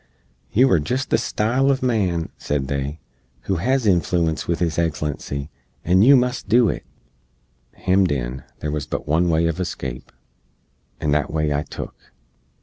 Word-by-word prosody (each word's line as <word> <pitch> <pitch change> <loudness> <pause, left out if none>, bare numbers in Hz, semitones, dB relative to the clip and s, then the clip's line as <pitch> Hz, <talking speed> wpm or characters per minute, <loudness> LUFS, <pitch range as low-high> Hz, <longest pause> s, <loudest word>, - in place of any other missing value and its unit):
"You 130 +5 +5
are 85 - +5
jist 125 - -2
the - - +5
style 120 +5 0
uv 135 -2 +2
man," 95 -9 0
said 70 -2 -2
they, 70 +2 -3 0.4
"who 95 +8 -1
hez 130 +7 +1
inflooence 85 -3 +1
with 85 - +1
His 85 -2 -1
Eggslency, 75 -3 -2 0.4
and 95 +4 +5
yoo 140 +4 +8
must 125 -4 0
do 120 -1 +5
it." - - -3 0.9
Hemmed 95 -2 +2
in, 65 -1 -3 0.2
there 75 - -2
wuz 75 -1 -3
but - - -4
one 85 +4 +2
way 80 0 +2
uv 85 +1 0
escape, 65 -8 -5 0.9
and 75 -2 0
that 75 0 0
way 75 -1 0
I 70 - 0
took. - - -9
85 Hz, 160 wpm, -22 LUFS, 75-105 Hz, 0.9 s, yoo